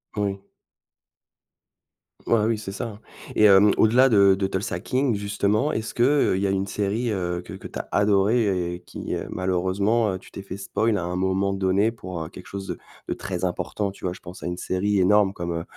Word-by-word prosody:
Oui. 100 -1 -2 1.9
Ah, 110 -2 +3
oui. 115 0 +1
c'est 95 -3 -6
ça. 110 -1 -6 0.4
Et, 105 - +5
hem, 100 0 +7
au-delà 120 +4 +5
de 100 -5 +5
de 95 0 -1
Tulsa 95 +4 -2
King 130 -3 0
justement 105 +6 0
est-ce 110 -4 -3
que, 120 - +2
heu, 140 -7 +3
il - - -2
y - - +2
a - - +1
une 95 0 -1
série, 105 +4 -1
heu, 90 -3 -2
que 90 - -10
que 95 - -8
tu - - -7
as - - -6
adorée 100 -3 +2
et 90 - -11
qui, - - -6
heu, - - -4
malheureusement, 95 +4 +1
heu, 95 - -4
tu - - -16
t'es 100 - -8
fait 95 0 -7
spoil 105 +2 0
à - - -3
un 90 +1 -3
moment 95 +1 +1
donné 95 +3 +2
pour, 90 -7 -7
heu, 80 - -8
quelque 90 - -12
chose 95 -1 -6
de - - -4 0.3
de - - -1
très 95 -2 -5
important 100 +3 -2
tu 95 - -10
vois? 90 - -1
Je - - -12
pense 90 +1 -11
à - - -5
une 90 0 -3
série 95 +2 0
énorme 100 +1 +4
comme, 85 -2 -4
heu, 85 0 -3
100 Hz, 220 wpm, -24 LUFS, 95-105 Hz, 1.9 s, hem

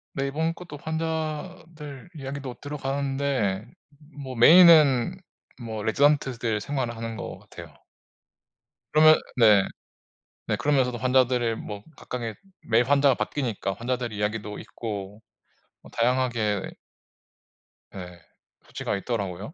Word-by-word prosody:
네. 135 0 -1
이번 160 +4 -1
것도 170 -4 -10
환자들 160 -1 -5
이야기도 135 -2 -6
들어가는데 135 -7 -2 0.6
뭐 130 -1 -7
메인은 155 +1 +7 0.4
뭐 110 -2 -5
레지던트들 120 -3 +1
생활을 130 -4 -3
하는 115 0 -5
것 - - -7
같아요. - - -12 1.2
그러면 155 +1 +7 0.2
네. 105 -4 +6 0.8
네 - - 0
그러면서도 130 -4 +1
환자들의 125 -3 +2
뭐 105 -2 -7
각각의 115 -3 -5 0.3
매일 115 +2 +4
환자가 140 0 +4
바뀌니까 115 -8 -3
환자들의 120 +1 -3
이야기도 105 0 -3
있고 105 -2 -7 0.6
뭐 - - -16
다양하게 115 -4 0 1.2
예. 90 -2 -9 0.5
수치가 - - -4
있더라고요. 100 - -4
125 Hz, 265 characters per minute, -25 LUFS, 110-145 Hz, 1.2 s, 메인은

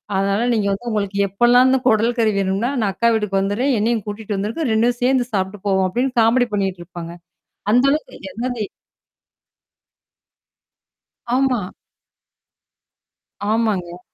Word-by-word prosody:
அதனால 200 +4 +1
நீங்க 210 -3 0
வந்து 200 +5 -4
உங்களுக்கு 200 -2 -2
எப்பொல்லாம் 240 +6 +4
இந்த 265 - +4
குடல் 230 +1 +3
கறி 220 -2 +3
வேண்ம்னா, 195 +4 0
நான் 205 -2 +1
அக்கா 235 - +1
வீட்டுக்கு 210 -3 0
வந்துடுறேன். 215 +8 0
என்னையும் 225 0 0
கூட்டிக்கொண்டு 210 0 -5
வந்துடுங்க. 215 +11 -2
இரண்டும் 235 +2 +1
சேர்ந்து 255 -1 +2
சாப்பிட்டுப் 190 0 -3
போவோம். 190 -1 +2
அப்படின்னு 250 +7 -1
காமடி 240 +2 +3
பண்ணிக்கொண்டு 190 -3 -2
இருப்பார்கள். 170 0 -9 0.5
அந்த 250 +3 +4
அளவுக்கு, 295 -9 -4
அது 235 +3 -4
அது. 235 -4 -3 2.7
ஆமா. 260 -2 +2 1.9
ஆமாங்க. 195 -6 -1
215 Hz, 125 wpm, -20 LUFS, 195-240 Hz, 2.7 s, எப்பொல்லாம்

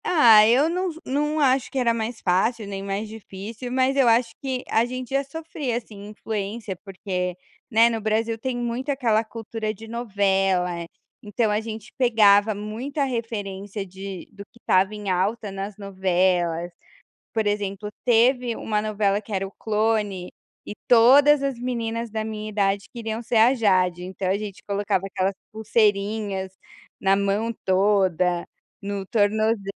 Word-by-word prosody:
Ah, 230 -11 +7
eu 255 +7 +4
não 365 +2 -1 0.2
não 295 +3 0
acho 265 -2 +2
que - - -6
era 240 -3 +2
mais 225 0 -3
fácil 210 +5 +1
nem 195 -1 -5
mais 200 +2 -3
difícil, 220 +3 -8
mas 260 +1 +2
eu 270 -3 +4
acho 230 +1 +3
que 260 -2 -3
a 225 - +3
gente 255 +1 -5
já 275 +1 +1
sofria, 285 -4 -4
assim, 210 -4 -9
influência, 210 -1 -5
porque, 185 -2 -4 0.3
né, 230 -1 +5
no 225 -1 -1
Brasil 220 +1 0
tem 245 +2 -3
muito 240 +3 -3
aquela 235 -6 +2
cultura 225 -1 -5
de 220 +2 -11
novela, 195 -6 0 0.3
então 210 +1 0
a 210 +1 +1
gente 220 -1 -8
pegava 215 -4 +5
muita 230 +8 -3
referência 205 -5 -4
de 190 -1 -8
do 200 - -10
que - - -20
estava 190 0 +2
em 205 -2 -3
alta 200 +4 -1
nas 195 +1 -6
novelas, 180 -3 0 0.6
por 220 -1 0
exemplo, 205 0 -2 0.2
teve 245 0 +3
uma 210 -1 -1
novela 205 -2 0
que 215 - -9
era 195 0 -1
O 195 - -9
Clone, 210 -4 -1 0.3
e - - -6
todas 275 +5 +6
as 270 -3 -2
meninas 235 -2 -3
da 220 0 -3
minha 215 -1 -5
idade 200 -1 0
queriam 225 -1 -4
ser 235 - -3
a 225 +3 +6
Jade, 185 -7 +2
então 185 0 -3
a 195 - +2
gente 205 -2 -7
colocava 200 -2 -1
aquelas 190 0 -1 0.2
pulseirinhas 205 -3 0 0.4
na 195 0 +2
mão 200 +3 0
toda, 185 -3 +2 0.3
no 200 -1 -4
tornoze 215 +1 +1
215 Hz, 155 wpm, -24 LUFS, 195-235 Hz, 0.6 s, Ah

